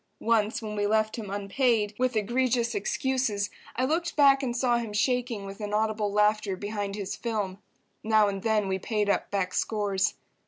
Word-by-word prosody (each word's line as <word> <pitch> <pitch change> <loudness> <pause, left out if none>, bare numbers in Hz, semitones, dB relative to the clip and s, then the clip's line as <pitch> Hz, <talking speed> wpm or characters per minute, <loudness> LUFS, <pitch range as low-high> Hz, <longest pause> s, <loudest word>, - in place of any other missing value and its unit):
Once 225 0 +1
when 210 -1 -4
we 205 0 0
left 215 0 +1
him 215 -4 -6
unpaid, 210 +2 +1
with 255 -1 +1
egregious 235 +2 +1
excuses, 215 0 -1 0.2
I 255 - +1
looked 335 +4 -1
back 280 -2 +6
and 245 -2 -2
saw 240 -1 +2
him 225 -3 -5
shaking 240 -1 0
with 195 +2 -8
inaudible 210 0 0
laughter 210 -1 +2
behind 205 0 -4
his 200 -2 -4
film. 205 -5 -3 0.4
Now 215 -1 +4
and 195 -1 -3
then 215 -2 +1
we 190 0 -1
paid 210 0 0
up - - -1
back 190 -2 -1
scores. 205 -2 0
215 Hz, 170 wpm, -27 LUFS, 205-240 Hz, 0.4 s, back